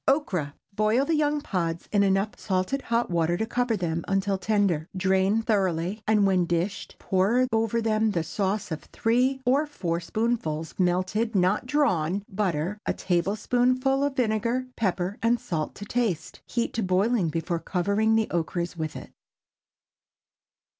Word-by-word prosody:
OKRA. 185 - +1 0.2
Boil 215 +6 +2
the 330 - 0
young 300 -1 +1
pods, 170 - -2
in 205 - +3
enough 195 +1 +2
salted 190 +8 -1
hot 235 -5 0
water 170 0 +1
to 220 - -1
cover 240 -1 0
them, 170 -2 -2
until 195 0 +1
tender. 190 -5 +1
Drain 190 +4 +2
thoroughly, 190 -2 0
and 210 -2 +4
when 185 -2 +3
dished 175 +4 -2
pour 205 +7 +2
over 225 +1 +1
them 220 0 +2
a 170 - +1
sauce 195 +2 -2
of 155 - -3
three 255 +4 +1
or 275 +5 +3
four 170 - -2
spoonfuls 170 -5 -2
melted 185 +5 +1
(not 190 +6 +2
drawn) 200 - +1
butter, 190 -1 -1
a - - +2
tablespoonful 250 +9 +1
of 285 -1 0
vinegar, 235 +1 0
pepper, 190 -2 -1
and 230 +1 +2
salt 160 -6 -3
to 205 - -8
taste. 205 -9 -2
Heat 235 -1 -1
to 230 - -1
boiling 190 0 +2
before 165 +2 -2
covering 200 +6 +1
the 220 -1 +3
okras 170 +1 -2
with 160 -2 -4
it. - - -9
200 Hz, 150 wpm, -26 LUFS, 175-230 Hz, 0.2 s, and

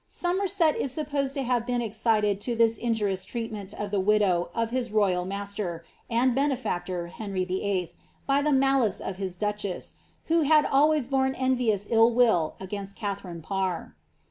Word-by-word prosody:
Somerset 360 -2 +1
is 270 - -2
supposed 280 -1 -2
to 275 - -1
have 245 -1 0
beeu 245 -1 0
excited 215 -2 +1
to 240 +2 -1
this 230 -1 +3
injurious 210 -5 0
treatment 215 -2 -5
of 205 -1 -5
the 205 - +1
widow 190 -3 +2
of 230 0 -1
his 250 -1 -1
royal 190 -4 +2
mas 200 +1 -4
ter, 175 -5 -4 0.3
and 245 +2 +2
benefactor, 235 -10 -1
Henry 195 -2 -3
VIII., 185 -2 -1 0.3
by 275 +1 +2
the 300 +1 +1
malice 270 -6 +3
of 190 - -5
his 190 -2 -4
duchess, 210 -1 -3 0.3
who 330 0 +2
had 305 0 +5
always 295 -1 +3
borne 265 -1 +1
envious 250 -6 +1
ill 225 0 +6
will 225 -10 +2
against 195 +1 -6
Katharine 195 -6 -5
Parr. 190 0 -2
220 Hz, 165 wpm, -27 LUFS, 195-260 Hz, 0.3 s, ill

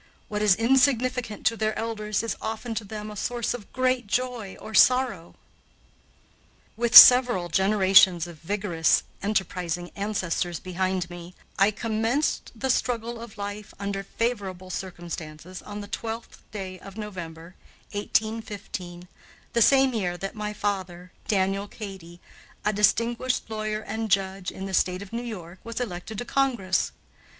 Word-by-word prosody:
What 210 0 -2
is 210 -3 +5
insignificant 250 -1 +2
to 230 - +3
their 215 -1 -1
elders 215 -2 -2
is 230 - -2
often 225 +2 -4
to 225 - -3
them 210 +1 -7
a - - -9
source 240 +3 -2
of 230 -5 -9
great 255 -3 0
joy 240 -3 -2
or 220 - -9
sorrow. 250 -9 +3 1.4
With 235 0 +6
several 245 -9 +9
generations 190 -2 +5
of 170 -3 -11
vigorous, 175 -2 +1 0.2
enterprising 180 -4 -2
ancestors 185 -4 -2
behind 185 0 -2
me, 175 +1 -10 0.2
I 195 +1 +6
commenced 225 +6 -1
the 265 +3 0
struggle 235 -2 -1
of 230 -3 -10
life 205 0 -6
under 200 0 -3
favorable 195 -4 -3
circumstances 175 -2 -7
on 205 0 -7
the 205 - -8
12th 225 +2 -6
day 190 -3 -6
of 195 +3 -12
November, 175 -5 -7 0.4
1815, 205 -4 -3 0.5
the 235 - +2
same 270 +2 +5
year 180 -6 -1
that 195 +2 -5
my 210 -1 -4
father, 185 -4 -3 0.2
Daniel 195 0 +1
Cady, 190 -6 -9 0.5
a 210 - +2
distinguished 230 +4 +1
lawyer 215 0 -2
and 220 +1 -4
judge 190 -1 0
in 190 - -7
the 195 - -6
State 185 +1 +1
of 200 - -14
New 235 - -2
York, 185 -7 -8
was 230 0 -5
elected 210 -2 -5
to 245 - -4
Congress. 240 -10 +1
205 Hz, 140 wpm, -26 LUFS, 185-230 Hz, 1.4 s, several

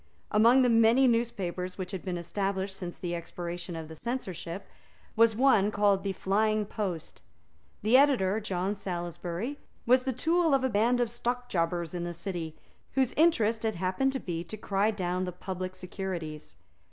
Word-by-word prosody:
Among 235 +5 +6
the 250 - +4
many 230 +3 +5
newspapers 190 -6 -1
which 185 -2 -5
had 190 - -5
been 180 -2 -3
established 190 +2 -2
since 175 -2 -6
the 175 -1 -4
expiration 175 0 -5
of 160 -1 -6
the 160 - -9
censorship, 190 - -5 0.5
was 230 -1 +5
one 225 -5 +4
called 205 -2 +2
the 200 - -1
Flying 215 +3 +1
Post. 185 -6 -4 0.6
The 220 +4 +4
editor, 235 -8 +4
John 195 -2 -1
Salisbury, 180 - -4 0.3
was 255 +2 +5
the 265 +1 -1
tool 320 +4 +2
of 265 - +1
a 260 - +2
band 235 +3 +2
of 240 - +1
stockjobbers 185 -9 -1
in 175 -1 -3
the 175 0 -4
City, 170 -3 -4 0.4
whose 260 -2 +2
interest 230 -9 +3
it 220 -1 0
happened 185 +10 0
to 265 - -2
be 170 -5 -4
to 195 +6 -8
cry 200 0 +1
down 185 -3 -1
the 180 - -3
public 185 +1 -5
securities. 180 -5 -6
195 Hz, 165 wpm, -29 LUFS, 175-235 Hz, 0.6 s, Among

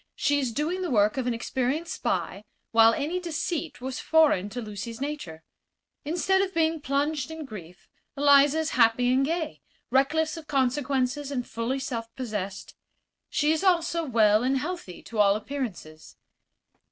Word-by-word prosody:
She 285 0 +1
is 260 -4 -1
doing 315 +9 -2
the 360 - -2
work 210 -4 +3
of 255 -2 -1
an 245 - +1
experienced 265 +7 -2
spy, 190 +2 -2 0.3
while 225 0 +6
any 300 +9 -2
deceit 330 -3 -3
was 260 0 -4
foreign 305 - +3
to 245 - -6
Lucy's 215 +1 -6
nature. 270 - -5 0.6
Instead 355 +5 +1
of 390 -2 -2
being 320 -1 +1
plunged 285 +1 -1
in 320 -1 -7
grief 180 -8 -11 0.3
Eliza 285 +1 +5
is 320 0 0
happy 245 +1 +3
and 265 +1 +3
gay, 320 +1 -2 0.3
reckless 310 +5 +2
of 315 -2 -10
consequences 270 0 0
and 255 -4 -3
fully 230 +4 -2
self 230 -4 -4
possessed. 210 -6 -5 0.6
She 305 0 +1
is 320 +4 0
also 340 -2 +2
well 220 -6 +3
and 265 +2 +1
healthy, 300 - -5
to 225 - -6
all 200 -1 +5
appearances. 210 - -6
270 Hz, 155 wpm, -26 LUFS, 230-315 Hz, 0.6 s, while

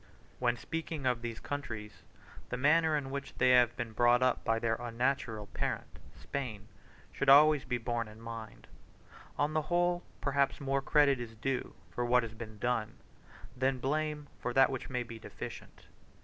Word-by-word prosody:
When 120 -1 +1
speaking 160 0 -4
of 125 -2 +1
these 115 -1 -5
countries, 110 -7 -6 0.5
the 125 - -2
manner 155 +3 +4
in 135 -2 -4
which 140 0 -5
they 130 - +5
have 125 -2 +5
been 120 -2 -3
brought 120 +2 +4
up 130 - +2
by 115 -1 +2
their 115 0 +1
unnatural 120 -2 -1
parent, - - -4 0.2
Spain, 110 - -5 0.4
should 140 - 0
always 150 +1 +7
be 125 - -1
borne 120 -1 -2
in 105 +1 -13
mind. 115 -2 -8 0.7
On 145 +1 +1
the 155 - +2
whole, 175 +2 +1 0.2
perhaps, 140 -1 +1
more 135 0 0
credit 140 -1 +4
is 115 -2 -7
due 130 +4 -2 0.2
for 120 - -2
what 125 0 +4
has 115 -1 -6
been 110 -1 -9
done, 115 -1 -1 0.6
than 130 +1 +1
blame 150 +3 -1
for 125 - -3
that 135 0 +6
which 130 - -5
may 125 -1 -1
be 115 -1 -9
deficient. - - -9
125 Hz, 170 wpm, -32 LUFS, 115-140 Hz, 0.7 s, always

